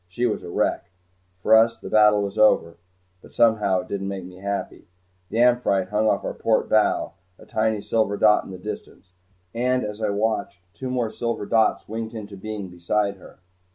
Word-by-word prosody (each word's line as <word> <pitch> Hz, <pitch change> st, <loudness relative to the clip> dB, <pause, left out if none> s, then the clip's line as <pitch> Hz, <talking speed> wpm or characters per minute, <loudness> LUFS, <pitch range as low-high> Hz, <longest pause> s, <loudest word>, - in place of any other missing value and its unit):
She 105 Hz, +8 st, -2 dB
was 110 Hz, -, -1 dB
a -, -, -9 dB
wreck. 85 Hz, -, -1 dB, 0.5 s
For 110 Hz, -, +6 dB
us 115 Hz, +1 st, +4 dB
the -, -, -10 dB
battle 105 Hz, -1 st, +4 dB
was 100 Hz, 0 st, -4 dB
over 105 Hz, -6 st, +3 dB, 0.4 s
but -, -, -17 dB
somehow 105 Hz, -5 st, +3 dB
it 90 Hz, -, -13 dB
didn't 95 Hz, -1 st, -4 dB
make 95 Hz, -2 st, -5 dB
me 90 Hz, 0 st, -12 dB
happy. 100 Hz, +1 st, -5 dB, 0.4 s
The -, -, -4 dB
"Amphitrite" 120 Hz, -6 st, +3 dB
hung 105 Hz, +1 st, +1 dB
off 100 Hz, -, +1 dB
our -, -, -3 dB
port 110 Hz, -, +1 dB
bow, 110 Hz, -7 st, +2 dB, 0.2 s
a -, -, -16 dB
tiny 110 Hz, -1 st, -1 dB
silver 110 Hz, -3 st, 0 dB
dot 105 Hz, 0 st, +4 dB
in -, -, -12 dB
the 95 Hz, -, -7 dB
distance, 90 Hz, 0 st, -9 dB, 0.4 s
and 125 Hz, +2 st, 0 dB
as 105 Hz, +1 st, -6 dB
I 105 Hz, -, 0 dB
watched 105 Hz, -1 st, -1 dB, 0.2 s
two 130 Hz, -, -6 dB
more 120 Hz, -3 st, -1 dB
silver 115 Hz, -3 st, -3 dB
dots 110 Hz, +1 st, +1 dB
winked 115 Hz, +1 st, -5 dB
into 105 Hz, -2 st, -7 dB
being 105 Hz, 0 st, -6 dB
beside 100 Hz, +3 st, -1 dB
her. 90 Hz, -, -16 dB
105 Hz, 190 wpm, -23 LUFS, 100-110 Hz, 0.5 s, For